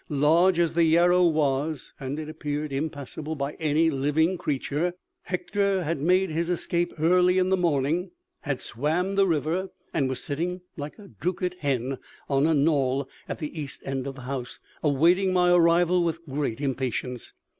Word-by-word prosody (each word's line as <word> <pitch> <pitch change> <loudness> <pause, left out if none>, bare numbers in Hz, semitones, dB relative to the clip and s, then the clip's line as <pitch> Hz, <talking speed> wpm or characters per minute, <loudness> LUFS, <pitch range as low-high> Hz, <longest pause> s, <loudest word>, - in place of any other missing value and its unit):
Large 165 +5 +4
as 170 -2 +2
the 170 0 +3
Yarrow 175 +2 +5
was, 150 -1 0
and 135 +1 -4
it 155 -1 -5
appeared 150 -2 -4
impassable 150 +1 -4
by 140 0 -3
any 160 +1 +2
living 150 +6 +1
creature, 150 +2 -1 0.3
Hector 195 +1 0
had 160 -2 -2
made 185 +3 +3
his 165 +2 -1
escape 175 0 0
early 180 +3 +4
in 185 0 +2
the 190 - +4
morning, 165 0 0 0.3
had 135 -3 -3
swam 160 - -1
the 195 0 +3
river, 170 +3 0 0.2
and 135 -2 +1
was 130 - -3
sitting, 175 +5 -3
'like 145 -1 -7
a 205 -2 -13
drookit 180 0 -3
hen,' 135 -2 -1 0.3
on 140 +2 +2
a 160 - +3
knoll 140 -2 +2 0.2
at - - -3
the 150 +1 -6
east 140 -2 -8
end 135 -1 -3
of 135 - -5
the 130 - -10
house, 125 -1 -5 0.2
awaiting 170 +6 +3
my 180 -1 +4
arrival 175 +1 +4
with 165 0 -2
great 140 -5 -2
impatience. 130 -3 -3
155 Hz, 165 wpm, -26 LUFS, 140-175 Hz, 0.3 s, Yarrow